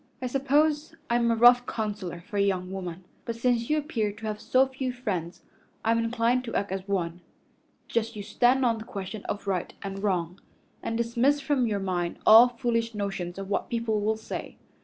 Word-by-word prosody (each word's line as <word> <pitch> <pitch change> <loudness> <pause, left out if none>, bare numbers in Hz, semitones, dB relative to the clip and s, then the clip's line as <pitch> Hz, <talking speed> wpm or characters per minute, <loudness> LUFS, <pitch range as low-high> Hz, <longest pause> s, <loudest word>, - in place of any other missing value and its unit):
I 255 - -4
suppose 295 +4 +1 0.2
I'm 235 0 +3
a 230 - +3
rough 245 +2 +6
counselor 205 -6 -4
for 205 +4 -7
a - - +3
young 185 -2 0
woman, 185 -2 -6 0.2
but 230 - -4
since 235 0 +1
you 305 - +3
appear 245 -9 -1
to 220 +2 -10
have 210 -1 -3
so 260 +1 +4
few 265 -1 -3
friends 195 -9 -4 0.4
I'm 230 +1 +3
inclined 230 +2 +1
to 230 - -5
act 200 -1 -1
as 190 0 -4
one. 175 -3 -2 0.7
Just 230 0 -1
you 205 - -5
stand 250 +5 +3
on 230 -2 +2
the - - -7
question 200 -1 -6
of 205 - -4
right 190 -3 -1
and 195 0 -5
wrong, 180 -3 -1 0.4
and 225 - -2
dismiss 235 +5 +2
from 275 -4 +1
your 205 -2 -1
mind 180 -3 -2
all 225 +3 +9
foolish 230 -2 -1
notions 195 -3 -3
of 195 0 -5
what - - -1
people 230 -3 0
will 215 +1 +1
say. 220 - -7
225 Hz, 195 wpm, -27 LUFS, 195-245 Hz, 0.7 s, all